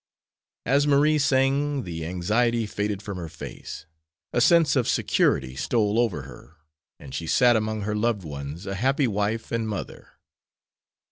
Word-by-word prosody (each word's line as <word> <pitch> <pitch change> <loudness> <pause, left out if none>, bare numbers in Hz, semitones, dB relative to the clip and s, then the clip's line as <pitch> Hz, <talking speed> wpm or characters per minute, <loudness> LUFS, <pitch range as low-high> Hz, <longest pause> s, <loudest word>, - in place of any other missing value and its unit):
As 140 +3 +3
Marie 150 +2 +4
sang 140 +1 +1
the 85 -3 -5
anxiety 110 +7 +1
faded 105 -1 -3
from 100 -3 -5
her 85 -2 -6
face, 80 0 -9 0.5
a - - +2
sense 165 -4 +5
of 125 -4 +1
security 65 -2 +1
stole 105 - +1
over 100 - 0
her, 65 -2 -13 0.4
and 70 -2 -11
she 80 +4 -4
sat 120 +6 +4
among 110 0 -1
her 105 +1 -2
loved 105 -2 0
ones 75 +3 -7
a 95 - -4
happy 135 +8 +1
wife 105 +1 -2
and 115 -1 -1
mother. 105 - -7
105 Hz, 150 wpm, -25 LUFS, 85-125 Hz, 0.5 s, sense